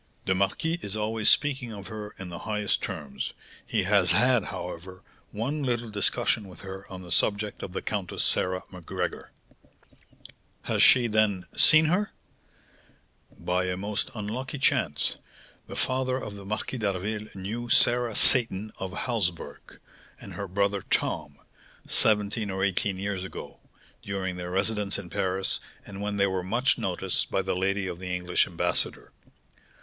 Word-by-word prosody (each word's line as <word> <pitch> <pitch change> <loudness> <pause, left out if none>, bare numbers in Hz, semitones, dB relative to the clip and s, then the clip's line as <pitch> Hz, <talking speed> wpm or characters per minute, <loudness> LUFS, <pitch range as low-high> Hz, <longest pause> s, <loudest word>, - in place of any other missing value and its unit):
"The 95 - +3
marquis 100 - 0
is 100 - -4
always 110 0 +2
speaking 135 -5 +2
of 100 -2 -8
her 105 -1 -7
in 95 -2 -7
the 85 0 -7
highest 105 -1 -1
terms; 70 -2 -4 0.3
he - - +1
has 95 -1 +3
had, 120 +5 +4
however, 90 +1 -7 0.3
one 135 +8 -2
little 120 -4 -1
discussion 105 0 +1
with 90 -3 -13
her 95 0 -9
on 95 -1 -7
the 90 - -8
subject 105 +1 +1
of - - -5
the - - -4
Countess 100 -4 -2
Sarah 90 0 +2
Macgregor." 90 -3 -4 1.3
"Has - - 0
she, 125 -2 +7
then, 105 -5 +2
seen 155 0 +7
her?" 185 +7 +1 1.3
"By 90 +1 0
a 90 0 -2
most 100 +2 -2
unlucky 120 +7 -4
chance, 135 - +2 0.5
the - - -7
father 130 0 0
of 105 -6 -6
the 100 -1 -10
Marquis 110 +5 -3
d'Harville 105 +1 -2
knew 110 +6 -4
Sarah 120 0 +3
Seyton 110 -4 +5
of 95 -1 -4
Halsburg, 90 - -3 0.4
and - - -10
her 100 - -5
brother 100 +1 0
Tom, - - -1 0.5
seventeen 105 0 +2
or 95 0 -2
eighteen 100 0 0
years 95 -1 -3
ago, 95 - -8 0.4
during 95 -2 -3
their 90 0 -5
residence 100 +2 0
in 90 -3 -8
Paris, 95 -1 -1 0.3
and 100 0 -8
when 105 0 -2
they 100 - +4
were 95 -1 -1
much 120 +8 +2
noticed - - -1
by - - 0
the - - -1
lady 95 +2 0
of 90 -2 -5
the 90 -1 -3
English 90 0 +2
ambassador. - - -1
100 Hz, 155 wpm, -27 LUFS, 95-110 Hz, 1.3 s, she